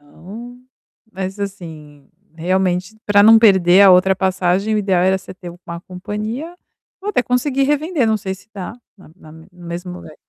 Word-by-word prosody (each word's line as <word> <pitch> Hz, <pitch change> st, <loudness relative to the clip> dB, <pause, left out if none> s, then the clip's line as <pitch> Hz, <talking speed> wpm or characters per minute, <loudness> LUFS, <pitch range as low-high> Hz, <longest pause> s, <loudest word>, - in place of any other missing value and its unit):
Então 215 Hz, +12 st, -12 dB, 0.5 s
mas 190 Hz, 0 st, -6 dB
assim, 160 Hz, -8 st, -8 dB, 0.3 s
realmente 185 Hz, +3 st, -1 dB
para 205 Hz, 0 st, +5 dB
não 225 Hz, +1 st, +8 dB
perder 190 Hz, -4 st, +5 dB
a 195 Hz, -, +8 dB
outra 185 Hz, +1 st, +4 dB
passagem 190 Hz, +2 st, 0 dB
o -, -, +1 dB
ideal 190 Hz, -3 st, +1 dB
era 190 Hz, +1 st, +2 dB
você 190 Hz, -, -12 dB
ter 180 Hz, -2 st, -10 dB, 0.2 s
uma 170 Hz, 0 st, -7 dB
companhia, 215 Hz, -, -6 dB, 0.4 s
ou 405 Hz, -, -6 dB
até 250 Hz, -, +1 dB
conseguir 260 Hz, +2 st, 0 dB
revender, 295 Hz, -1 st, 0 dB
não 220 Hz, 0 st, +2 dB
sei 190 Hz, -2 st, -5 dB
se 195 Hz, -, -19 dB
dá, 195 Hz, +1 st, -6 dB, 0.2 s
na 190 Hz, -, -18 dB
na 155 Hz, -, -16 dB
no 160 Hz, +1 st, -15 dB
mesmo 175 Hz, 0 st, -8 dB
lugar. 180 Hz, -3 st, -11 dB
190 Hz, 175 wpm, -18 LUFS, 180-220 Hz, 0.5 s, não